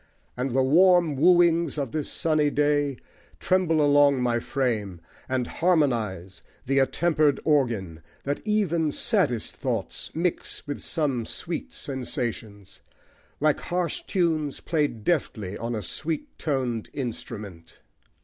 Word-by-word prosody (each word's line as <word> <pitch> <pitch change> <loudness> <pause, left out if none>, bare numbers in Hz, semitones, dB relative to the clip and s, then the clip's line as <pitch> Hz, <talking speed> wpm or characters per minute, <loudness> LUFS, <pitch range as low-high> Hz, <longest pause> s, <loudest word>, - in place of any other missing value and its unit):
And 125 0 -2
the 135 - +4
warm 170 +2 +5
wooings 170 0 +4
of 140 -5 -2
this 155 +1 -2
sunny 155 -2 +2
day 145 -2 +1 0.4
Tremble 165 - +2
along 145 -1 +5
my 120 -1 +1
frame 110 -9 -2 0.3
and 130 -1 0
harmonise 115 - 0 0.2
The 135 +1 +2
attempered 150 0 +2
organ, 115 - +1 0.2
that 145 +1 -2
even 175 -8 +1
saddest 180 - 0
thoughts - - -3
Mix 170 +1 -2
with 145 - -4
some 140 -7 -1
sweet 170 -1 -4
sensations, 115 -6 -5 0.6
like 155 0 +2
harsh 175 -2 -2
tunes 160 -6 0
Played 145 -9 -1
deftly 110 - -1
on 115 +2 -3
a 105 - -4
sweet 165 - -3
toned 130 -7 -2
instrument. 105 - -7
145 Hz, 120 wpm, -25 LUFS, 120-160 Hz, 0.6 s, warm